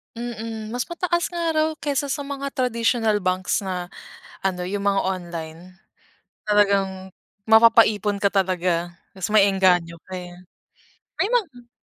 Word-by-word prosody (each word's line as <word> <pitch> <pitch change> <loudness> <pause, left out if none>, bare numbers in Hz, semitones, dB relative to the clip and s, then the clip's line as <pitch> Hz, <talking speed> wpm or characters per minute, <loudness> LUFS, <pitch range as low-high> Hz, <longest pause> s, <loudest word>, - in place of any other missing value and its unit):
Mm, 225 -2 -6
mas 245 0 -2
mataas 345 0 -1
nga 340 -2 -2
raw 310 0 +2
kaysa 285 -1 -1
sa 280 +1 -2
mga 280 0 -5
traditional 230 -3 +1
banks 185 0 0
na 180 -1 -4 0.6
ano 180 -2 0
'yung 200 +1 -3
mga 195 -1 +2
online 175 -1 -6 0.7
talagang 195 -2 +1 0.4
mapapaipon 220 -2 +5
katalaga. 180 -3 0 0.2
Mas 190 - -3
maengganyo 190 -5 +3
ka, - - -12
eh. 180 -1 -8 0.9
May 395 - +2
mga 280 - -2
205 Hz, 120 wpm, -23 LUFS, 185-245 Hz, 0.9 s, mapapaipon